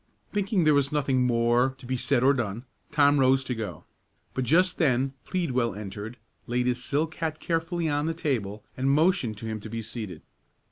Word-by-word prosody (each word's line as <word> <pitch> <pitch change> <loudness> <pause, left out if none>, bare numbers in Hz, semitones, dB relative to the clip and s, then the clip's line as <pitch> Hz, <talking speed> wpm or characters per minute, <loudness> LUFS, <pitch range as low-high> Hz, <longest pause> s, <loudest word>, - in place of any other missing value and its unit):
Thinking 200 -2 +1
there 155 -1 +5
was 140 -1 +2
nothing 135 -4 +2
more 120 +2 +2
to 135 - -14
be 130 +1 -1
said 120 0 +1
or 135 +2 +6
done, 120 -2 -3 0.2
Tom 145 -1 +4
rose 135 0 +4
to 130 - -2
go; 105 -9 -6 0.5
but 130 - -1
just 180 +8 +3
then 135 -4 +2
Pleadwell 130 - 0
entered, 105 +3 -7 0.3
laid 125 +1 0
his 125 0 0
silk 155 +5 -1
hat 160 -1 -2
carefully 165 0 -1
on 145 0 0
the 165 - -1
table, 110 -10 -2
and 130 +1 0
motioned 140 - +2
to 115 - -7
him 110 -1 -3
to 110 - -9
be 115 +1 -4
seated. 105 -7 -7
130 Hz, 190 wpm, -27 LUFS, 115-150 Hz, 0.5 s, or